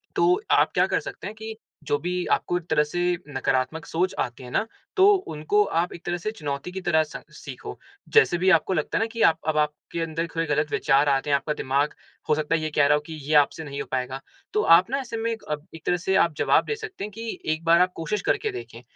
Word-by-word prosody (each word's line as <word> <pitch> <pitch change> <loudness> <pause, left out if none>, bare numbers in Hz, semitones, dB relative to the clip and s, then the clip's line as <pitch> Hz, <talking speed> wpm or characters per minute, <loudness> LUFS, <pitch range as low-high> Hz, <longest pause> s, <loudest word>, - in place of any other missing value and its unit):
तो 365 +3 +3
आप - - +4
क्या - - +4
कर - - +1
सकते - - -7
हैं 215 - -7
कि 220 0 -7 0.3
जो 145 0 +1
भी 180 +1 -2
आपको 175 - +1
एक 180 - -6
तरह 150 - +4
से 150 +4 -4 0.3
नकारात्मक 135 +2 -1
सोच 180 +3 -1
आते 120 +1 -3
हैं 125 - -9
ना, 215 - +1 0.3
तो 380 -1 +6
उनको 205 - 0 0.2
आप 175 +1 -1
एक 170 - -11
तरह 175 0 -1
से 195 +5 -3
चुनौती 145 -5 -5
की 190 - -5
तरह 160 -3 +3
स 150 - -9 0.2
सीखो। - - -8 0.4
जैसे 445 - +5
भी 185 +2 +2
आपको 175 +2 +3
लगता 155 -3 -1
है - - +1
ना - - +1
कि 230 -1 -4
आप 160 0 +5
अब 155 - +1
आपके 150 +2 -2
अंदर 165 +1 -2
थोड़े 165 - 0
गलत 150 0 0
विचार 140 0 +3
आते 135 +1 +1
हैं, 140 - +4
आपका 150 +2 -3
दिमाग, 140 +2 0 0.4
हो 150 - +5
सकता 155 +1 0
है, 160 - -1
ये 155 - -2
कह 145 - +5
रहा 150 - +5
हो 150 - -1
कि 160 - -8
ये 155 - -2
आपसे 150 +2 +3
नहीं 140 -2 -5
हो - - -7
पाएगा। 130 +1 -2 0.3
तो 210 - +2 0.2
आप 185 +6 -1
ना, 275 +2 0
ऐसे 235 -3 -5
में 230 +1 -1
एक 225 - -6
अप 150 0 -3
एक 160 - -13
तरह 180 - +2
से 190 +2 0
आप 170 -4 +3
जवाब - - +3
दे 445 - -2
सकते 430 - -7
हैं 210 - -5
कि 225 +2 -6
एक 155 +1 -6
बार 170 +1 +6
आप 180 0 +3
कोशिश 195 +5 -2
करके - - +1
देखें, 120 -1 -8
165 Hz, 260 wpm, -25 LUFS, 150-190 Hz, 0.4 s, तो